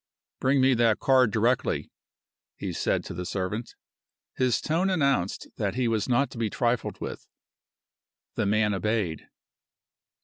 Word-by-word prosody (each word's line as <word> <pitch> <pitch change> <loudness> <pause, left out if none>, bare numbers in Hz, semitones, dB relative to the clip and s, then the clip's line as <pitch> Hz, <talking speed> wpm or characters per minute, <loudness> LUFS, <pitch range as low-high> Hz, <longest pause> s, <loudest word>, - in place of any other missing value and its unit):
"Bring 135 +1 +3
me 130 0 +5
that 115 -3 +3
card 130 -3 +4
directly," 115 +4 0 0.7
he - - -4
said - - 0
to - - -7
the 90 - -4
servant. 95 +5 -4 0.6
His 125 -2 +1
tone 170 +5 0
announced 140 - 0
that 100 -2 -1
he 125 -1 +1
was 110 0 0
not 135 +3 +2
to 115 - -8
be 115 -2 0
trifled 120 +1 -1
with. - - -6 1.1
The - - -1
man 105 0 +2
obeyed. 100 -4 -1
115 Hz, 140 wpm, -27 LUFS, 105-130 Hz, 1.1 s, me